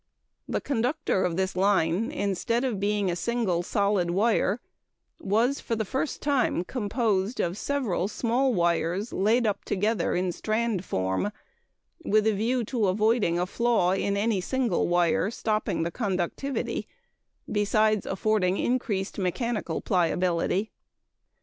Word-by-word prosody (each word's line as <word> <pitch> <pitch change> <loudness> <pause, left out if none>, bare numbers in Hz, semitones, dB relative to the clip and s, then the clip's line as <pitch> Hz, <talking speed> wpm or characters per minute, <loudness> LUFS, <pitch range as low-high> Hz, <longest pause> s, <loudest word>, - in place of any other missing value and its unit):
The - - -1
conductor 265 -3 0
of 170 -1 -1
this 190 -1 -1
line 190 +2 +2
instead 230 - -1
of 240 -7 -1
being 205 -1 +1
a - - -2
single 215 -4 0
solid 200 -2 +1
wire 210 +3 +2 0.6
was, 230 +8 +1
for 230 - -2
the 220 -1 -2
first 265 +8 -3
time, 275 -10 +1
composed 215 -1 -1
of 175 +1 0
several 220 -7 -1
small 245 +5 +1
wires 175 +2 0
laid 225 +5 +2
up 205 -2 -1
together 210 +3 0
in 180 0 0
strand 215 0 -1
form 95 - -1 0.7
with 215 +1 +2
a 220 - +3
view 235 +5 0
to 225 -3 0
avoiding 210 -2 +2
a 175 - +1
flaw 225 -2 +1
in 200 +1 0
any 205 -2 +1
single 260 +4 0
wire 175 +2 +2
stopping 215 -6 -1
the 170 - -2
conductivity, 200 +6 -2 0.6
besides 215 0 +2
affording 195 -1 +1
increased 215 -6 -1
mechanical 195 -1 -2
pliability. 180 +2 +1
205 Hz, 130 wpm, -27 LUFS, 185-235 Hz, 0.7 s, a